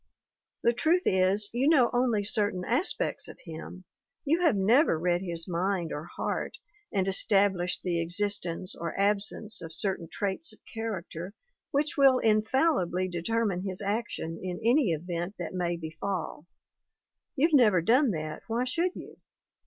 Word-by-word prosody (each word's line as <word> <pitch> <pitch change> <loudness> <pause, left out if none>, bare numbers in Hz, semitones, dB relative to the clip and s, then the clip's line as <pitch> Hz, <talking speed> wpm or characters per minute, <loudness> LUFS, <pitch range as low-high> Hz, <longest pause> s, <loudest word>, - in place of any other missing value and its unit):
The 235 - +4
truth 335 +9 +2
is, 190 +2 +2
you 260 +5 +2
know 260 -7 +4
only 240 -4 +2
certain 205 -4 +1
aspects 275 - 0
of - - -11
him; 165 +2 -9 0.4
you 320 +5 +2
have 330 -9 +4
never 215 - +4
read 175 +2 +1
his 170 -3 -4
mind 180 -1 -1
or 150 +2 -5
heart - - -3 0.3
and 195 -2 0
established 195 -2 +2
the 175 -2 0
ex 170 +1 -1
istence 195 -3 -1
or 170 +2 -5
absence 205 +1 0
of 165 -1 -8
certain 185 -1 -1
traits 205 +9 -2
of - - -19
character 200 -4 -5 0.3
which 295 +3 0
will 270 -2 +6
infallibly 215 - +2
determine 190 +2 -1
his 190 -1 -4
action 200 -5 -3
in 180 -1 -4
any 245 0 +4
event 175 +4 -3
that 175 - -5
may 175 -2 -1
befall. 160 0 -5 0.9
You've 315 +3 +2
never 220 -10 +6
done 255 - +4
that 155 -5 -4
why 235 +2 0
should 335 +8 -1
you - - -10
200 Hz, 150 wpm, -28 LUFS, 175-235 Hz, 0.9 s, will